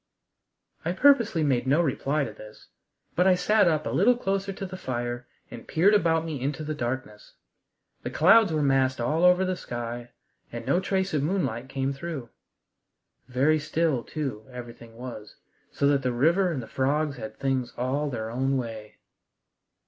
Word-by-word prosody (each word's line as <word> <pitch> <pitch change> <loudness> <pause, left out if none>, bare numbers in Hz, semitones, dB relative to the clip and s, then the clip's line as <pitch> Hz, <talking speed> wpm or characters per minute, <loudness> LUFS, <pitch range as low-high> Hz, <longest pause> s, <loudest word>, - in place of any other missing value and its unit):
I 170 - -1
purposely 230 - +4
made 130 -3 +1
no 140 +5 +4
reply 150 -1 0
to - - -5
this, 110 0 -14 0.5
but 180 +2 +3
I 185 - +6
sat 210 +3 +3
up 155 -2 +1
a - - -2
little 235 +7 +4
closer 195 -3 -1
to 195 0 -6
the 185 0 -7
fire 120 -5 -4 0.2
and 115 - -10
peered 190 +6 +3
about 165 -5 +3
me 155 -5 -4
into 145 +3 -2
the 155 0 -3
darkness. 120 -5 -5 0.7
The - - -4
clouds 200 +4 +5
were 155 -2 0
massed 135 -2 +2
all 150 +8 0
over 180 +1 +5
the 185 0 -1
sky 120 -4 -6 0.4
and - - -6
no 175 - +2
trace 190 0 -1
of 150 - +1
moonlight 135 - -1
came 135 +1 -1
through. 140 -4 -6 1.0
Very 135 +5 +2
still, 155 -4 0
too, 135 -8 -5
everything 120 -2 -10
was, 115 -4 -8 0.4
so - - -1
that 140 -1 +2
the 130 -1 0
river 170 +9 +2
and 135 -7 -3
the - - -10
frogs 140 +1 0
had 110 -2 -8
things 130 -3 -1
all 135 +4 -1
their 110 -4 -4
own 135 +3 0
way. 110 -4 -6
140 Hz, 170 wpm, -26 LUFS, 125-170 Hz, 1.0 s, I